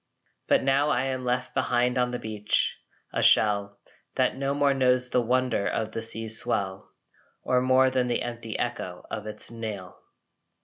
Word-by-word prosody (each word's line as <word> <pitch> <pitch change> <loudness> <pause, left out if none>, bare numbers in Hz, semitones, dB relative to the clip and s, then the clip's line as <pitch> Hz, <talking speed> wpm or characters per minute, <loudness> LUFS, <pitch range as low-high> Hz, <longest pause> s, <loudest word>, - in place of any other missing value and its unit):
But - - +3
now 135 +2 +2
I 125 -3 +1
am 130 -1 -3
left 125 0 -1
behind 125 0 +1
on 125 -1 +1
the 125 - -3
beach 105 -2 0 0.4
a - - 0
shell 100 -1 +3 0.4
That - - +1
no 135 +1 -1
more 140 -1 +3
knows 125 -1 +2
the 125 - +2
wonder 125 -3 0
of 110 0 -2
the 115 - -4
sea's 110 0 -1
swell, 95 -1 -2 0.5
Or 125 0 +2
more 130 +1 +4
than 130 -1 +1
the 120 - 0
empty 115 -2 -5
echo - - -4
of 105 - -5
its 105 - -7
knell. 105 -6 -7
125 Hz, 170 wpm, -26 LUFS, 110-130 Hz, 0.5 s, more